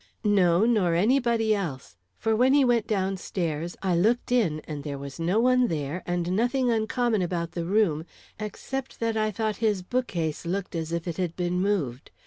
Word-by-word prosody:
"No, 190 Hz, -2 st, +4 dB
nor 205 Hz, -8 st, +2 dB
anybody 230 Hz, +2 st, +2 dB
else. 150 Hz, -, -4 dB, 0.2 s
For 220 Hz, 0 st, +1 dB
when 255 Hz, +4 st, +4 dB
he 285 Hz, -2 st, +5 dB
went 235 Hz, -3 st, +2 dB
down 195 Hz, -2 st, 0 dB
stairs, 170 Hz, -2 st, -3 dB
I 185 Hz, -2 st, +2 dB
looked 225 Hz, +9 st, +1 dB
in 195 Hz, -12 st, +2 dB
and 150 Hz, -2 st, -7 dB
there 140 Hz, -1 st, -4 dB
was 140 Hz, +2 st, -8 dB
no 175 Hz, +6 st, +1 dB
one 250 Hz, +1 st, +4 dB
there, 155 Hz, +1 st, -3 dB
and 175 Hz, 0 st, -1 dB
nothing 245 Hz, +3 st, +2 dB
uncommon 225 Hz, -1 st, +1 dB
about 170 Hz, -2 st, -2 dB
the 170 Hz, -1 st, -4 dB
room, 175 Hz, -5 st, +1 dB, 0.3 s
except 260 Hz, +5 st, -5 dB
that 230 Hz, -1 st, 0 dB
I 215 Hz, 0 st, +1 dB
thought 215 Hz, 0 st, -2 dB
his 210 Hz, -5 st, 0 dB
bookcase 180 Hz, -9 st, -2 dB
looked 185 Hz, +2 st, -3 dB
as 165 Hz, -1 st, -3 dB
if 170 Hz, +1 st, -3 dB
it 170 Hz, -, -3 dB
had 180 Hz, -3 st, -2 dB
been 180 Hz, 0 st, -1 dB
moved. 155 Hz, -11 st, -1 dB
190 Hz, 185 wpm, -26 LUFS, 170-225 Hz, 0.3 s, he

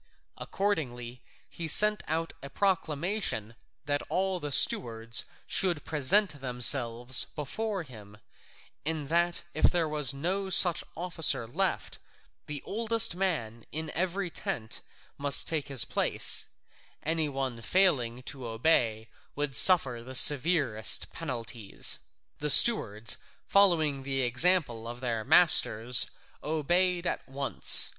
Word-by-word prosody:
Accordingly, 125 Hz, -11 st, -5 dB, 0.3 s
he 165 Hz, -, -8 dB
sent 210 Hz, +6 st, +4 dB
out 165 Hz, +1 st, -4 dB
a 140 Hz, -, -10 dB
proclamation 175 Hz, -, -3 dB, 0.3 s
that 145 Hz, 0 st, -3 dB
all 190 Hz, 0 st, -3 dB
the 145 Hz, -3 st, -7 dB
stewards 115 Hz, -3 st, +2 dB, 0.2 s
should 175 Hz, -6 st, -3 dB
present 155 Hz, +1 st, 0 dB
themselves 125 Hz, -1 st, +2 dB
before 195 Hz, -, -5 dB
him, 105 Hz, -7 st, -15 dB, 0.7 s
and 155 Hz, -1 st, -4 dB, 0.4 s
if -, -, 0 dB
there 170 Hz, -3 st, 0 dB
was 150 Hz, -3 st, +1 dB
no 185 Hz, +8 st, -4 dB
such 175 Hz, -2 st, +5 dB
officer 165 Hz, -8 st, +1 dB
left, 180 Hz, +11 st, -4 dB, 0.5 s
the 145 Hz, -2 st, -8 dB
oldest 225 Hz, -2 st, +1 dB
man 120 Hz, -, -4 dB
in 160 Hz, 0 st, -6 dB
every 185 Hz, +1 st, -4 dB
tent 110 Hz, -7 st, -5 dB, 0.4 s
must 140 Hz, -1 st, +1 dB
take 155 Hz, -3 st, -2 dB
his 135 Hz, -4 st, +3 dB
place; -, -, +1 dB, 0.6 s
any 160 Hz, -1 st, -2 dB
one 135 Hz, -4 st, -6 dB
failing 130 Hz, -8 st, 0 dB
to 130 Hz, -2 st, -7 dB
obey 115 Hz, -2 st, -1 dB, 0.3 s
would 145 Hz, -2 st, -3 dB
suffer 135 Hz, -10 st, +5 dB
the 130 Hz, +2 st, -10 dB
severest 140 Hz, -6 st, +3 dB
penalties. 120 Hz, -8 st, -3 dB, 0.4 s
The 150 Hz, -, -4 dB
stewards, 115 Hz, -, +5 dB, 0.3 s
following 160 Hz, -8 st, +1 dB
the 135 Hz, 0 st, -3 dB
example 125 Hz, -3 st, +2 dB
of 120 Hz, +1 st, -9 dB
their 115 Hz, -3 st, -4 dB
masters, 125 Hz, -7 st, +4 dB, 0.3 s
obeyed 175 Hz, +4 st, -1 dB
at -, -, -5 dB
once. 135 Hz, +1 st, +4 dB
145 Hz, 115 wpm, -27 LUFS, 120-175 Hz, 0.7 s, such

